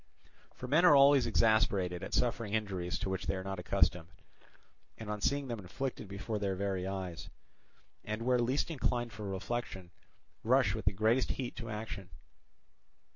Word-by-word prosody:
For 125 - -7
men 155 +7 +4
are 175 -5 +8
always 140 -2 +6
exasperated 105 -6 +2
at - - -3
suffering 115 -3 0
injuries 95 -5 -2
to 100 - -3
which 95 - -3
they - - 0
are 95 - -4
not 95 -1 -4
accustomed, 85 -1 +1 0.9
and 110 -2 -6
on 105 -1 -4
seeing 140 +3 0
them 120 -3 -4
inflicted 110 +5 -5
before 105 +2 -4
their 100 -2 -1
very 95 -1 -2
eyes; 90 -3 -5 0.7
and 110 +2 -4
where 125 0 +3
least 130 +7 0
inclined 120 -5 -1
for 105 -1 -7
reflection, 95 -2 -4 0.5
rush - - +3
with - - -5
the - - +4
greatest 110 +6 +2
heat 125 -2 -5
to 115 -2 -6
action. 105 -3 -6
105 Hz, 165 wpm, -32 LUFS, 95-120 Hz, 0.9 s, are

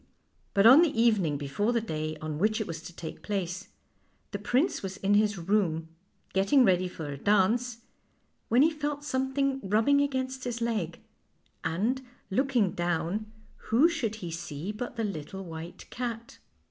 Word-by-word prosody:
But 200 +1 +5
on 260 +7 +10
the 305 -8 +2
evening 200 -11 +3
before 145 +11 -1
the 235 - +3
day 155 -7 -3
on 155 -1 -5
which 215 +4 +2
it 220 - -1
was 165 -3 -6
to 170 - -9
take 160 - -7
place 190 -2 -3 0.6
the 200 - -3
prince 255 - +1
was 190 0 -5
in 200 +1 +1
his 210 0 +3
room, 165 -3 0 0.4
getting 200 +8 +4
ready 185 -2 +3
for 160 -4 -6
a 140 - -6
dance, 220 - +2 0.7
when 245 +4 +5
he 320 - +4
felt 295 -1 -3
something 270 0 0
rub 210 +3 +1
bing 285 0 +5
against 260 -2 -2
his 240 -1 -3
leg, 215 -8 -2 0.6
and, 210 +11 0 0.3
looking 245 -3 +2
down, 175 +5 -2 0.4
who 245 +9 +6
should 265 -11 -2
he 170 - -4
see 165 +2 -5
but 245 +3 -5
the 230 - -2
little 190 0 -5
white 165 0 -8
cat. 235 -1 -5
210 Hz, 165 wpm, -29 LUFS, 175-245 Hz, 0.7 s, on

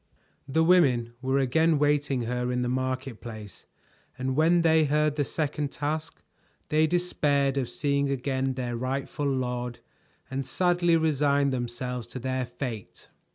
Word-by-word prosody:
The 160 +4 +2
women 135 -10 +4
were 130 +1 +1
again 155 +4 +3
waiting 145 -3 +1
her 125 +1 -2
in 125 0 0
the - - -1
market 130 -1 -2
place, 110 -4 -10 0.5
and 130 0 -2
when 170 +3 +4
they 160 -1 +4
heard 150 +1 +1
the 145 - +1
second 145 -1 -2
task, 155 +2 -4 0.5
they 155 +1 +3
despaired 145 -5 +1
of 130 -3 -1
seeing 140 +2 0
again 135 0 -1
their 125 -2 -3
rightful 135 +3 -2
lord 125 -2 -2 0.5
and 135 +1 -2
sadly 175 +3 +2
resigned 145 -3 +2
themselves 125 -1 -4
to 130 - -7
their 130 0 -2
fate. 120 -4 -7
135 Hz, 145 wpm, -27 LUFS, 125-150 Hz, 0.5 s, women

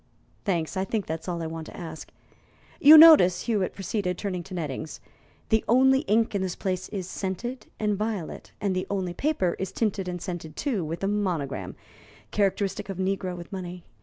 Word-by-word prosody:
"Thanks. 170 -3 -1
I 190 - 0
think 205 0 -2
that's 160 +2 -5
all 170 -2 -2
I - - -3
want 160 0 -6
to - - -11
ask. 160 -2 -8 0.7
You 310 -1 +10
notice," 305 - +8
Hewitt 210 -5 -1
proceeded, 195 -2 -2
turning 185 -4 -3
to 185 - -8
Nettings, 155 -2 -5 0.5
"the 220 -1 +3
only 265 +3 +5
ink 225 +2 +3
in 200 - 0
this 185 -2 -2
place 185 -1 -3
is 190 -4 -4
scented 205 +8 -4
and 210 -1 +1
violet, 210 -4 -4
and 195 -2 0
the 185 - -2
only 190 -3 -2
paper 190 - 0
is 190 -1 -3
tinted 200 -4 -1
and 180 0 -3
scented, 170 -3 -6
too, 235 - -1
with 165 +4 -5
a - - +2
monogram 185 -9 -2 0.6
characteristic 200 0 0
of 190 -1 -5
a - - +1
negro 185 -1 -2
with 175 - -10
money. 180 -2 -6
190 Hz, 190 wpm, -26 LUFS, 175-210 Hz, 0.7 s, You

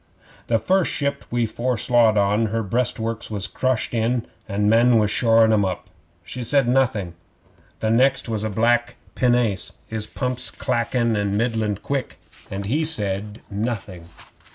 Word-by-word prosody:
'The 115 - +3
first 185 - +1
ship 140 -1 -2
we 120 -1 +1
foreslowed 120 -1 +2
on, 105 +3 +2
her 115 +1 -2
breastworks 115 +1 -2
was 100 -3 -2
crushed 130 -3 -1
in, 115 +1 0 0.2
an' 105 +1 0
men 115 +2 +5
was 105 -1 +2
shorin' 115 -1 +4
'em 105 -2 +3
up. 95 -2 -4 0.3
She 125 +8 -6
said 135 +2 +3
nothing. 120 -9 +1 0.7
The 110 - +1
next 130 +4 +3
was 110 -2 -2
a 110 - -1
black 120 +3 +1 0.2
pinnace, 120 -6 +1
his 110 -1 -5
pumps 125 -1 -3
clackin' 115 -5 0
middling 110 -2 0
quick, 140 -2 -3 0.3
and 100 +1 -5
he 145 +10 0
said 105 -8 -2
nothing. 100 -5 -4
115 Hz, 145 wpm, -22 LUFS, 105-125 Hz, 0.7 s, men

